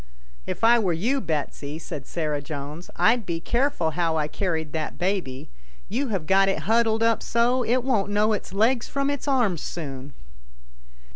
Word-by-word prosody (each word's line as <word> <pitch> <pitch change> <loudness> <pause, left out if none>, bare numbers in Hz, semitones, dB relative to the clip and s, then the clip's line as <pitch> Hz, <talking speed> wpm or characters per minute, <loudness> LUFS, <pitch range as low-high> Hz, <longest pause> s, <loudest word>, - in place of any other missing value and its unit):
" - - -27
If - - -6
I 235 +1 +6
were 190 -6 +1
you, 240 +12 0
Betsy," 150 -3 -3
said 150 -4 -7
Sarah 150 -3 -2
Jones, 145 +3 -7
" - - -27
I'd 230 +1 +4
be 170 -3 -3
careful 235 - 0
how 165 -1 0
I 150 -1 0
carried 160 -2 -2
that 155 -1 -3
baby. 175 -9 -2 0.4
You 260 +8 -1
have 195 -8 -2
got 195 +3 +4
it 195 - -1
huddled 225 +1 +3
up 230 -1 +3
so, 240 +2 +2
it 245 +2 +1
won't 225 -7 +1
know 210 +1 +2
its 210 - -4
legs 230 +5 +2
from 275 0 0
its 285 0 -4
arms 235 - +2
soon." 140 -4 -6
195 Hz, 185 wpm, -25 LUFS, 155-235 Hz, 0.4 s, I